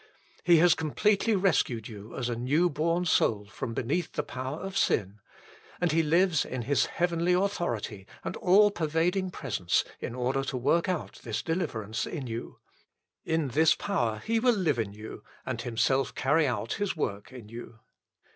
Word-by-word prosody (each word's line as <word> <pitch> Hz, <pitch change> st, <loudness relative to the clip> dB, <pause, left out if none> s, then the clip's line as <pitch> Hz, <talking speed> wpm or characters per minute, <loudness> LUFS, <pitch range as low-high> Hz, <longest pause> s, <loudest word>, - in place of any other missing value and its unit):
He 175 Hz, -1 st, +6 dB
has 170 Hz, +1 st, +6 dB
completely 205 Hz, +7 st, +1 dB
rescued 155 Hz, -, +1 dB
you 110 Hz, 0 st, -10 dB
as 125 Hz, -2 st, -1 dB
a 120 Hz, -, -1 dB
new 145 Hz, +9 st, +2 dB
born 165 Hz, +4 st, 0 dB
soul 105 Hz, -10 st, +2 dB
from 115 Hz, +2 st, -6 dB
beneath 165 Hz, +8 st, -1 dB
the 150 Hz, -, -1 dB
power 130 Hz, +1 st, -5 dB
of 195 Hz, +2 st, -6 dB
sin; 100 Hz, -, +1 dB, 0.6 s
and 175 Hz, -2 st, +1 dB
He 165 Hz, +1 st, +3 dB
lives 165 Hz, +1 st, +3 dB
in 125 Hz, -2 st, -4 dB
His 135 Hz, +2 st, +2 dB
heavenly 175 Hz, 0 st, +1 dB
authority 120 Hz, -, -1 dB, 0.2 s
and -, -, -4 dB
all 205 Hz, +3 st, +5 dB
pervading 175 Hz, +3 st, 0 dB
presence 105 Hz, -, 0 dB, 0.2 s
in 120 Hz, -, -5 dB
order 130 Hz, +2 st, 0 dB
to 130 Hz, -, -3 dB
work 150 Hz, +8 st, +2 dB
out 180 Hz, -4 st, -3 dB
this 115 Hz, -3 st, -3 dB
deliverance 115 Hz, -, -2 dB
in 145 Hz, -6 st, -5 dB
you. 115 Hz, 0 st, -6 dB, 0.7 s
In 160 Hz, -3 st, 0 dB
this 155 Hz, +5 st, +4 dB
power 120 Hz, -, -1 dB
He 225 Hz, 0 st, +2 dB
will 245 Hz, 0 st, +3 dB
live 160 Hz, -, +1 dB
in 110 Hz, -3 st, -1 dB
you 105 Hz, +2 st, -9 dB, 0.2 s
and -, -, -3 dB
Himself 130 Hz, +3 st, 0 dB
carry 150 Hz, +4 st, +2 dB
out 120 Hz, -2 st, -2 dB
His 205 Hz, -4 st, -2 dB
work 100 Hz, -6 st, -3 dB
in 125 Hz, -5 st, -10 dB
you. 115 Hz, 0 st, -9 dB
150 Hz, 170 wpm, -28 LUFS, 115-175 Hz, 0.7 s, He